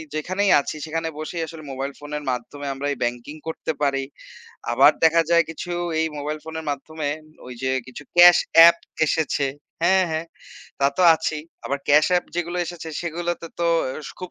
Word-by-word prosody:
যেখানেই 185 +6 0
আছি, 140 - -6
সেখানে 165 +1 -3
বসেই 165 +2 -4
আসলে 160 -1 -10
মোবাইল 135 +1 -4
ফোনের 150 0 -6
মাধ্যমে 125 +4 -5
আমরা 135 +1 -4
এই - - -9
ব্যাংকিং 120 +4 -3
করতে 160 0 -3
পারি। 135 -1 +1 0.7
আবার - - +6
দেখা 165 +1 +5
যায় 170 0 +5
কিছু 170 +2 -6 0.3
এই 160 - +1
মোবাইল 150 +2 -3
ফোনের 160 0 -6
মাধ্যমে 145 +2 -4 0.4
ওই 125 - -8
যে 130 - 0 0.2
কিছু 130 +3 -10
ক্যাশ 175 0 +9 0.2
এ্যাপ 170 +1 +9 0.3
এসেছে 150 -3 0 0.4
হ্যাঁ, 190 +1 +4
হ্যাঁ 160 +1 -2 0.5
তা 140 - +4
তো 185 - +4
আছেই। 155 -1 -3 0.2
আবার 140 - -1
ক্যাশ 150 +1 +6
এ্যাপ 180 0 +2
যেগুলো 175 0 -2
এসেছে 165 -1 -7
সেগুলো 170 +1 -3
তো, - - -5
তো 170 - +2 0.2
অ্যা 130 +3 -5 0.2
খুব 180 -1 -6
160 Hz, 175 wpm, -23 LUFS, 145-170 Hz, 0.7 s, ক্যাশ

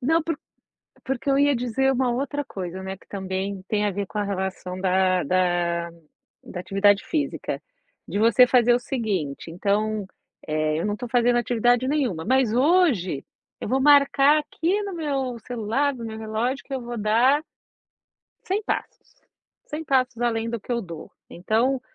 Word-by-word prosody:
Não, 320 +6 +2
por 325 -1 -3 0.7
porque 265 +1 -2
eu 275 - +3
ia 285 0 +4
dizer 250 +2 +1
uma 255 -1 +1
outra 285 +3 -2
coisa, 185 -6 -6
né, 190 0 -6
que - - -24
também 190 0 -4
tem 210 -1 0
a 205 - +1
ver 200 +1 -3
com 210 - -7
a 205 - +1
relação 190 -2 -4
da 185 -1 +2
da 175 0 0 0.5
da 180 - -7
atividade 195 +2 +3
física, 305 -3 -2 0.5
de - - -3
você 235 +3 +6
fazer 245 -1 +4
o 240 - +2
seguinte, 200 - -3
então, 205 +3 0 0.4
eh, 155 0 0
eu - - -2
não 210 - 0
estou 240 +3 -6
fazendo 240 0 +3
atividade 245 +1 +2
nenhuma, 260 - 0
mas 255 -1 +2
hoje, 255 - +2 0.4
eu - - -5
vou 260 +5 +1
marcar 285 +1 +5
aqui 340 +6 -1
no 400 -1 -5
meu 275 -7 -2
celular, 245 +4 0
do 235 -2 -7
meu 220 -1 -6
relógio 220 +5 -2
que 275 - -7
eu 265 - -2
vou 240 0 -6
dar 235 +7 +3 1.0
100 395 +3 0
passos, - - -5 0.5
100 305 +2 -5
passos 255 -4 +1
além 230 -1 0
do 235 - -3
que 210 - -8
eu 235 -1 0
dou. 170 -5 -9 0.2
Então, 230 +9 0
235 Hz, 170 wpm, -24 LUFS, 195-270 Hz, 1.0 s, você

